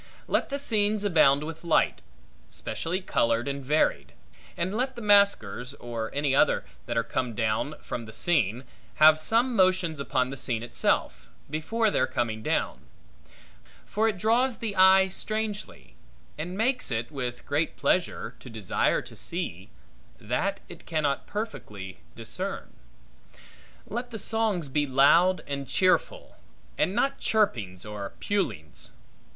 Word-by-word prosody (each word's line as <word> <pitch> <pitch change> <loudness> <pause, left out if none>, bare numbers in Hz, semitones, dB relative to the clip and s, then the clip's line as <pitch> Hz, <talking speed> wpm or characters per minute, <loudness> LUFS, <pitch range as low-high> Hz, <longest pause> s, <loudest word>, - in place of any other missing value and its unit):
Let - - 0
the 280 - -2
scenes 215 -6 +1
abound 150 -7 +4
with 160 +2 -7
light, 170 -2 +2 0.5
specially 180 +4 -3
colored 115 -8 +1
and 140 0 -3
varied; 130 - +1 0.4
and 180 +3 -1
let 255 +4 -1
the 235 - -7
masquers, 200 -10 +3
or 115 -3 -5
any 145 -1 0
other, - - +3 0.2
that 120 - -2
are 115 - +2
to - - -23
come 125 -3 -2
down 115 +7 -1
from 120 - -5
the 110 - -10
scene, 120 - +1 0.3
have 155 0 +7
some 235 +8 +2
motions 185 -5 +2
upon 130 -2 0
the 135 - -6
scene 120 -3 -2
itself, 120 - -1 0.2
before 215 +9 0
their 130 - +2
coming 110 -2 -2
down; - - -2 1.0
for 215 +2 +1
it 215 -4 -1
draws 230 +5 +2
the 220 -3 -4
eye 190 0 +7
strangely, 215 +2 -4 0.4
and 175 +5 -5
makes 250 +4 +2
it, 115 +2 -2
with 125 -4 -5
great 150 +3 -1
pleasure, 180 -1 0
to 125 - -11
desire 110 -5 0
to - - -12
see, 100 - -5 0.5
that - - -2
it - - -13
cannot 150 -4 -1
perfectly 105 - -6 0.2
discern. - - -4 1.1
Let 240 +3 -5
the 230 - -6
songs 215 -6 +2
be 145 +2 0
loud 165 +8 +4
and 140 -1 -4
cheerful, 185 - +1 0.4
and 190 - 0
not 275 +3 +1
chirpings 110 - 0
or 105 -2 -6
pulings. 185 - -3
155 Hz, 140 wpm, -27 LUFS, 125-205 Hz, 1.1 s, have